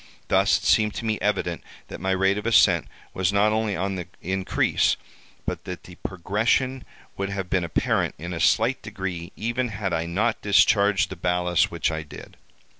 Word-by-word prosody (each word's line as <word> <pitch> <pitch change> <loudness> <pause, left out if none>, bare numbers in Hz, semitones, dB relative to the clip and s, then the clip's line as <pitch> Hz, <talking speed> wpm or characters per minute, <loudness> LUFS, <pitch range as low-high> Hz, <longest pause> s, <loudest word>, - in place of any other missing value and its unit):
Thus - - +4
it - - -10
seemed 105 -1 +3
to 115 - -4
me 110 -1 0
evident 100 -5 -1 0.3
that - - -8
my 95 - -1
rate 95 +2 +2
of 105 - -5
ascent 90 -7 +4 0.3
was 95 0 +1
not 100 +1 +3
only 110 -2 0
on 95 +2 -2
the 90 -2 -6
increase, 95 +1 +1 0.5
but - - -3
that 90 -1 -7
the 90 - -12
progression 110 +9 -1 0.3
would 100 0 -2
have 95 -2 -4
been 95 -2 +2
apparent 85 - 0
in 85 +3 -6
a 80 - -4
slight - - +2
degree 90 -3 -5
even 120 +3 -1
had 100 -4 -3
I 80 +1 -1
not 110 +7 0
discharged 100 -1 +3
the - - -4
ballast 90 0 +1
which 85 -1 -1
I 80 0 -3
did. 75 - -12
95 Hz, 185 wpm, -24 LUFS, 90-105 Hz, 0.5 s, Thus